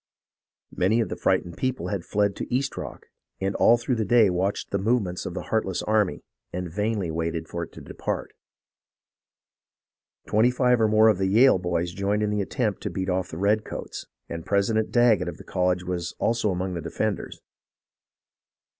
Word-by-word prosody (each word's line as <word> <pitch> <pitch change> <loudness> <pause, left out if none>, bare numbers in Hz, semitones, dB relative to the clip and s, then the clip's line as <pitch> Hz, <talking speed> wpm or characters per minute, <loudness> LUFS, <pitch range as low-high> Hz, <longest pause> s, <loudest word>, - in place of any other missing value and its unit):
Many 105 +6 +2
of 115 - 0
the - - -3
frightened 90 -2 0
people 130 0 -2
had 100 -4 -2
fled 100 +1 0
to - - -6
East 130 +3 0
Rock, - - -7 0.3
and 95 +1 -1
all 120 - +6
through 120 +1 -1
the 110 - +1
day 110 -2 +4
watched 95 +3 -1
the 100 - 0
movements 100 -4 0
of 90 - -6
the - - -4
heart 110 - +3
less 95 -2 -3
army, 105 -3 +1 0.3
and 90 -2 -5
vainly 105 -3 -1
waited 80 0 -2
for 85 - -4
it 85 - -6
to - - -10
depart. - - -4 1.9
Twenty 110 +4 +3
five 125 -1 +2
or 110 - +5
more 110 +1 +5
of 105 -4 +3
the 95 - +1
Yale 115 +2 +5
boys 90 -1 -1
joined 100 +3 0
in 105 - 0
the 105 -1 0
attempt 105 +1 -2
to - - -3
beat 95 0 -3
off 90 -1 -1
the 80 - -7
redcoats, 105 +3 -2 0.2
and 85 0 -6
President 105 +3 +1
Daggett 120 -4 +4
of - - -8
the - - -12
college 90 0 0
was 90 -1 -4
also 115 -2 +1
among 90 0 -2
the 85 - -4
defenders. 95 +5 -3
100 Hz, 185 wpm, -25 LUFS, 90-110 Hz, 1.9 s, all